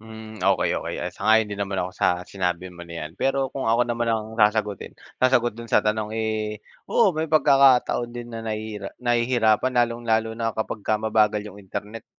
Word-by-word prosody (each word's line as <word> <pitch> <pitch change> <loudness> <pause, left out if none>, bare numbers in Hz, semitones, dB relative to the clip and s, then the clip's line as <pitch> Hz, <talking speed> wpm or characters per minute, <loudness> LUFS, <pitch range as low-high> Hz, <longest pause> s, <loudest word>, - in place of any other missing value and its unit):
Hmm, 110 0 -11
okey, 95 +1 +2
okey. - - -5
Ah, - - -3
sang-ayon 110 -1 +2
din 100 - -5
naman 100 -1 -2
ako 90 - -4
sa 90 -1 0
sinabi 90 -1 -3
mo 85 -1 -11
na 85 - -9
'yan. 75 - -6
Pero 135 -1 0
kung 135 -3 -4
ako 115 +2 +3
naman 120 -1 -2
ang 110 0 -2
sasagutin 105 -2 +1 0.2
sasagot 120 -3 +2
dun 115 - -7
sa - - +3
tanong 105 0 -1
eh, 110 -1 -2 0.2
oo 220 -5 +4
may 160 0 -2
pagkakataon 135 -5 +4
din 120 0 -7
na 115 - -6
nahihira 110 -2 -5
nahihirapan, 120 0 +2
lalong-lalo 115 -2 0
na 115 -1 -1
kapagka 110 -1 -2
mabagal 110 -1 +2
'yung 105 -1 -10
internet, 105 +3 -7
110 Hz, 180 wpm, -24 LUFS, 105-120 Hz, 0.2 s, oo